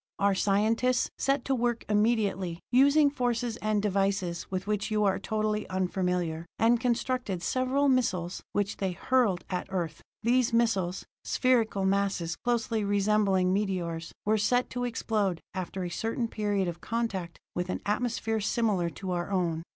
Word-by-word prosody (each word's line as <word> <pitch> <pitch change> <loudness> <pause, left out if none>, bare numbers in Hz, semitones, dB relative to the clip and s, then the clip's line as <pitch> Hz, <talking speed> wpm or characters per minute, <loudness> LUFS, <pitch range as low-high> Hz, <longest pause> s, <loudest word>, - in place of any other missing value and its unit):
Our 200 0 +3
scientists 220 +6 +2
set 275 -1 +1
to 270 - +1
work 240 -2 0
immediately, 205 -5 +1
using 285 +3 +5
forces 245 -3 -1
and 215 -2 0
devices 195 -3 0
with 185 0 -3
which 210 -1 -1
you 215 -1 +1
are 195 -1 +2
totally 215 +1 -1
unfamiliar, 180 -3 -1
and 230 +1 +4
constructed 245 -6 -1
several 260 +6 +1
missiles 190 -10 +1
which 205 0 -1
they 190 -2 -1
hurled 225 -4 +1
at 180 - -2
Earth. 170 -5 -3 0.2
These 240 +1 +2
missiles, 200 -6 +1 0.2
spherical 230 -6 +2
masses 195 -4 0
closely 230 -2 -1
resembling 200 -2 +2
meteors, 175 -5 -2
were 215 +1 +2
set 245 +4 +1
to 245 -1 -2
explode 210 -6 -1
after 185 0 -4
a 175 - -3
certain 225 +5 -1
period 205 -4 -1
of 170 -1 -5
contact 200 -7 -3 0.2
with 180 +1 -3
an - - -2
atmosphere 225 0 -1
similar 205 -5 +1
to 185 +2 -6
our 175 0 -2
own. 175 -4 0
205 Hz, 150 wpm, -29 LUFS, 185-235 Hz, 0.2 s, using